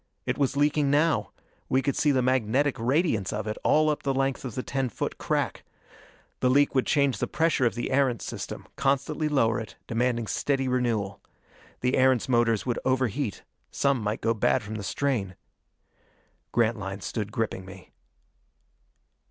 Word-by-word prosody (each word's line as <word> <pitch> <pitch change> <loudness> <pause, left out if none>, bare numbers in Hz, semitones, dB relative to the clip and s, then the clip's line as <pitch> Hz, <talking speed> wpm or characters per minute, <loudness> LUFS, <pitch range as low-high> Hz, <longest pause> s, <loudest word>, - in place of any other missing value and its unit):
It - - 0
was 140 0 +1
leaking 145 0 +2
now: 145 -7 +2 0.4
we 130 +1 +2
could 140 - 0
see 150 - +2
the 130 -3 +3
magnetic 130 +2 +2
radiance 120 - +1
of 105 0 -3
it 110 0 -3
all 155 +1 +4
up 150 -1 0
the 135 -1 -1
length 135 0 0
of 125 -5 -6
the 130 - -3
ten 135 -2 -1
foot - - -4
crack. - - -1 0.8
The 125 - +2
leak 140 +2 +4
would 130 -2 +1
change 140 -3 +2
the 125 - -1
pressure 160 -5 +2
of 115 - -3
the 120 - -3
Erentz 130 -4 +2
system, - - -6
constantly 140 +3 0
lower 115 -7 +2
it, 110 - -8
demanding 120 0 0
steady 135 +6 0
renewal. 115 -6 -1 0.6
The 125 +1 +1
Erentz 130 -2 +3
motors 120 -4 +2
would 120 -2 -1
overheat; 130 -3 -1 0.3
some 140 -3 +1
might 105 +1 -2
go 115 - +2
bad 115 +2 +1
from 105 +1 -7
the 105 -2 -5
strain. 105 -6 -1 1.2
Grantline 105 -4 0
stood 105 0 -4
gripping 110 -4 -2
me. 95 0 -13
125 Hz, 165 wpm, -27 LUFS, 110-140 Hz, 1.2 s, all